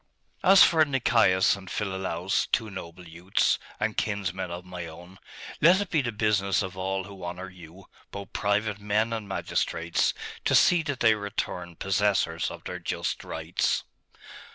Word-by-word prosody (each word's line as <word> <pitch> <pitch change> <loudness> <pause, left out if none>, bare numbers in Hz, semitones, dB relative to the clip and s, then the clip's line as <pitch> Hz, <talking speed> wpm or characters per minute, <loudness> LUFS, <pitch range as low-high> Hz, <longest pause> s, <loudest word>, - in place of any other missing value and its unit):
'As 195 0 +8
for 160 -3 +5
Nicaeus 115 -10 +3
and 95 -2 -11
Philolaus, 95 -2 -1
two 110 -3 -1
noble 90 -2 -9
youths, 85 +5 0 0.2
and 105 0 -1
kinsmen 95 -4 -2
of 90 +1 -7
my 90 -2 -7
own, 90 +3 -13 0.4
let 175 +5 +6
it 205 - -4
be 155 - +3
the 120 -3 -2
business 105 -3 +1
of 95 -1 -6
all 95 +1 -2
who 95 -1 -11
honour 90 +2 -6
you, 90 +1 -14 0.2
both 100 -2 -9
private 105 0 0
men 105 +3 0
and 110 -2 -4
magistrates, 85 -3 -1 0.3
to - - +2
see 175 -1 +5
that 145 -5 -4
they 115 -2 +6
return 100 -4 -4
possessors 95 -4 0
of - - -10
their - - -6
just - - -3
rights. - - -1
95 Hz, 155 wpm, -27 LUFS, 90-110 Hz, 0.4 s, As